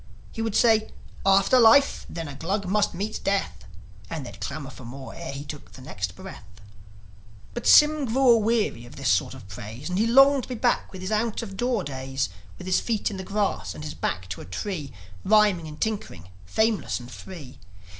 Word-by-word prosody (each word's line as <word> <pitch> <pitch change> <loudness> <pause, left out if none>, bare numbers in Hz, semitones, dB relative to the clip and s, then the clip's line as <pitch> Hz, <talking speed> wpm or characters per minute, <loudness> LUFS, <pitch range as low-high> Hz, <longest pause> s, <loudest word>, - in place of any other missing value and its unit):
He 225 - -5
would 225 -2 -2
say 220 -2 +4 0.4
"After 195 +6 +5
life, 245 +5 +5
then 165 -2 -5
a 145 - -7
Glug 190 +8 -2
must 205 +3 +1
meet 205 +4 -4
death!" 195 - -1 0.4
And 160 -5 -5
they'd 100 -4 -11
clamour 140 +6 -5
for 130 - -12
more 130 +3 -9
ere 170 -3 -6
he 140 +1 -6
took 145 - -9
the - - -12
next - - -5
breath. - - -10 1.1
But 240 - -4
Sym 300 -1 +6
grew 255 +2 +4
aweary 220 - +1
of - - -13
this 135 -1 -1
sort 95 - +1
of 95 - -12
praise, 110 - -8
And 180 - 0
he 225 - +3
longed 270 +3 +6
to - - -10
be 250 - -3
back 240 +1 0
with 185 - -9
his 185 +3 -4
out 220 +1 0
o' - - -4
door 225 +2 -1
days, 135 - -3 0.3
With 180 - -9
his 185 - +2
feet 220 -1 -1
in 195 - -6
the 190 - -5
grass 200 +1 -2
and 150 - -8
his 150 - -5
back 90 0 -3
to 95 - -5
a - - -9
tree, 150 - -5 0.3
Rhyming 205 -6 +4
and 150 0 -10
tinkering, 195 - -3 0.2
fameless 220 - +1
and 120 0 -11
free. 150 -7 -10
190 Hz, 205 wpm, -25 LUFS, 140-225 Hz, 1.1 s, Sym